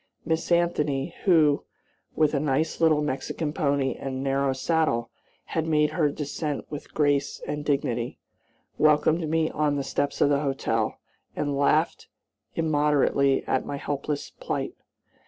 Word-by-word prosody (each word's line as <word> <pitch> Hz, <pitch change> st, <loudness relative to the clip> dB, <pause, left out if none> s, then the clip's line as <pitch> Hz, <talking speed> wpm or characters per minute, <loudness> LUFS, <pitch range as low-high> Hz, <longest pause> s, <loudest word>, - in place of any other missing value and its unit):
Miss 160 Hz, +1 st, -1 dB
Anthony, 165 Hz, -3 st, +1 dB
who, 155 Hz, -6 st, +4 dB, 0.5 s
with 155 Hz, -1 st, +3 dB
a 140 Hz, -, +2 dB
nice 150 Hz, +3 st, 0 dB
little 155 Hz, -2 st, +4 dB
Mexican 150 Hz, +2 st, -3 dB
pony 140 Hz, -4 st, +1 dB
and 135 Hz, 0 st, -5 dB
narrow 135 Hz, 0 st, +1 dB
saddle, 130 Hz, -4 st, 0 dB, 0.4 s
had 160 Hz, -1 st, 0 dB
made 150 Hz, -1 st, +3 dB
her 155 Hz, -4 st, +2 dB
descent 145 Hz, 0 st, -4 dB
with 145 Hz, -, -7 dB
grace 145 Hz, -2 st, +1 dB
and 150 Hz, 0 st, -3 dB
dignity, 125 Hz, -5 st, -1 dB, 0.6 s
welcomed 155 Hz, +1 st, +3 dB
me 160 Hz, 0 st, +1 dB
on 150 Hz, -1 st, +1 dB
the 140 Hz, -, -1 dB
steps 140 Hz, +1 st, -2 dB
of -, -, +4 dB
the 140 Hz, -1 st, +3 dB
hotel, 135 Hz, -6 st, -1 dB, 0.4 s
and 145 Hz, -1 st, -1 dB
laughed 150 Hz, +3 st, +1 dB, 0.5 s
immoderately 145 Hz, -3 st, +2 dB
at 130 Hz, -, 0 dB
my 140 Hz, -, -3 dB
helpless 145 Hz, +1 st, -3 dB
plight. -, -, -4 dB
145 Hz, 135 wpm, -26 LUFS, 140-155 Hz, 0.6 s, who